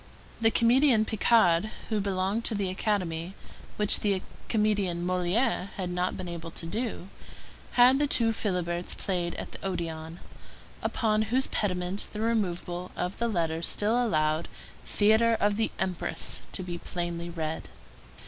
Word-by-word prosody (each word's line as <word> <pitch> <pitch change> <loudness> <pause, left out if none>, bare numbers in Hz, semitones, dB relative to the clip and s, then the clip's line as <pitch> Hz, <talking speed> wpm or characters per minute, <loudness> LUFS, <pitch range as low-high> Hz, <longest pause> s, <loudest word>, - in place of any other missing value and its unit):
The 225 - +5
comedian 235 0 +4
Picard, 215 -4 +3 0.2
who 215 -2 +1
belonged 195 +3 0
to 225 - +3
the 195 -2 -1
Academy, 185 -3 -2 0.4
which 210 -1 +5
the 200 -3 0 0.3
comedian 200 -6 +1
Molière 185 +3 +1
had 180 -2 -4
not 180 +1 -1
been 185 - -5
able 170 -1 -6
to 165 - -8
do, 215 0 -3 0.6
had 250 +2 +6
The 295 - +3
Two 230 -4 +2
Philiberts 180 -5 -2
played 175 -3 -2
at - - -6
the - - -10
Odéon, 165 -3 -4 0.6
upon 215 -2 +1
whose 260 +3 +2
pediment 185 -1 -2
the 210 - -5
removal 180 -5 -1
of 180 +2 -3
the 235 - +1
letters 165 -5 -1
still 225 +4 +2
allowed 155 -6 +1 0.4
THEATRE 220 +2 +4
OF 205 0 +2
THE 220 - +1
EMPRESS 180 -2 -1
to 185 - -5
be 175 -1 -5
plainly 175 -1 -4
read. 160 -2 -4
190 Hz, 145 wpm, -28 LUFS, 175-220 Hz, 0.6 s, had